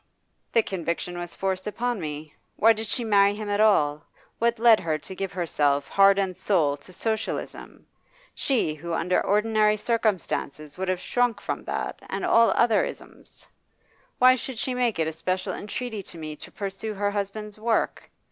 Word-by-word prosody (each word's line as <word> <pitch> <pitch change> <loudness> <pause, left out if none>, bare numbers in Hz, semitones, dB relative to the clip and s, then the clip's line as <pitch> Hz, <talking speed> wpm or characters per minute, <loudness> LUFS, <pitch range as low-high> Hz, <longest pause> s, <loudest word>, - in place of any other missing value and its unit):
'The 230 - +4
conviction 175 -1 -3
was 175 0 -6
forced 190 0 -2
upon 240 0 -2
me. 150 -1 -6 0.2
Why 225 +1 +5
did 220 0 -5
she 240 - -1
marry 200 -2 +4
him 210 0 -5
at 205 - 0
all? 150 -9 +3 0.4
What 235 +1 +2
led 230 -1 +6
her 160 -2 -1
to 170 - -10
give 195 0 -3
herself, 145 -5 0
heart 195 0 +5
and 190 -2 0
soul, 160 -9 +1
to 145 - -16
Socialism, 220 +4 -4 0.5
she 240 - 0
who 165 +3 -6
under 180 +2 +1
ordinary 215 +1 +2
circumstances 195 - -2
would 190 +1 -4
have 185 -1 0
shrunk 245 -1 0
from - - -4
that - - -3
and - - -2
all 230 0 +5
other 235 -2 +4
isms? - - -9 0.7
Why 255 +1 +7
should 255 0 -6
she 255 +3 -1
make 245 -3 0
it 160 -1 +1
a 160 - -3
special 185 +4 -2
entreaty 220 +1 -5
to 175 - -11
me 155 -1 -6
to - - -10
pursue 200 +1 -5
her 205 +1 0
husband's 205 +1 -4
work? 225 +1 -1
200 Hz, 175 wpm, -25 LUFS, 170-225 Hz, 0.7 s, Why